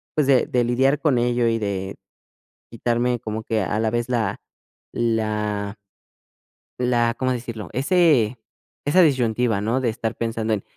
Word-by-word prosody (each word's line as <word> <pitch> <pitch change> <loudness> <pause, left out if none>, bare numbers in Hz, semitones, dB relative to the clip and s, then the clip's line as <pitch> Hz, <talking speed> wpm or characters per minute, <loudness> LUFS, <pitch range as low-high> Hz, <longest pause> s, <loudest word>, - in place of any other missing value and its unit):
pues, 150 -3 +2
de 135 -2 +4
de 125 -1 +1
lidiar 130 +4 +2
con 145 -6 +2
ello 120 0 +1
y 115 0 +1
de 100 -2 -3 0.7
quitarme 120 +1 0
como 110 0 -5
que 110 -2 0
a 100 +3 -1
la 110 -1 +1
vez 120 +1 -1
la 115 -5 -1 0.5
la 105 -3 -1 1.0
la, 120 -1 +1
¿cómo 130 0 0
decirlo? 115 -3 -5
Ese 135 - +3 0.5
esa 150 +6 +4
disyuntiva, 120 - +2
¿no?, 115 +6 0
de 125 - +1
estar 110 0 -3
pensando 115 -1 -2
en, 105 - -2
115 Hz, 150 wpm, -22 LUFS, 110-125 Hz, 1.0 s, de